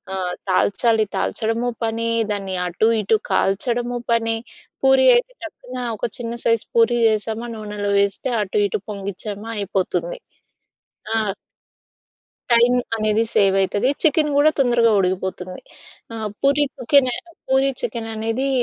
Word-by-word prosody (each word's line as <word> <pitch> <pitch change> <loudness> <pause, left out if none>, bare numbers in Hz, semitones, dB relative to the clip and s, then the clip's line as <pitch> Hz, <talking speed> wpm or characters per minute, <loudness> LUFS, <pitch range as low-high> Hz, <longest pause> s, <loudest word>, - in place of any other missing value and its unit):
ఆహ్, 180 -2 -2 0.2
తాల్చాలి 220 +4 +2
తాల్చడము 230 +2 -1
పని. 230 +1 -1 0.2
దాన్ని 195 -2 -3
అటు 195 +6 +1
ఇటు 215 +2 +2
కాల్చడము 240 +5 0
పని. 225 -1 +1 0.5
పూరి 265 0 +5
అయితే - - 0
టక్కున 255 -5 -9 0.2
ఒక - - -2
చిన్న 235 -1 -5
సైజ్ 230 -2 +2
పూరి 235 +1 +4
చేసామా 220 +2 -1
నూనెలో 210 -1 -4
వేస్తే 200 +6 -1
అటు 205 0 -2
ఇటు - - -3
పొంగించామా 200 +2 -5
అయిపోతుంది. 205 - -2 1.0
ఆ! - - +2 1.4
టైం 235 +1 +5 0.2
అనేది 215 0 +1
సేవ్ 195 -1 +4
అయితది. 205 +5 0 0.2
చికెన్ 305 -1 +3
గూడా 295 +2 +5
తొందరగా 240 -3 +3
ఉడికిపోతుంది. 185 0 -2 0.6
ఆహ్, 220 -1 -3
పూరి 280 +1 +3
కుకిన్ 255 +1 +3
ఆయి - - -5 0.3
పూరీ 265 +1 +3
చికెన్ 230 -1 -4
అనేది 225 +5 -2
225 Hz, 125 wpm, -21 LUFS, 205-245 Hz, 1.4 s, పూరి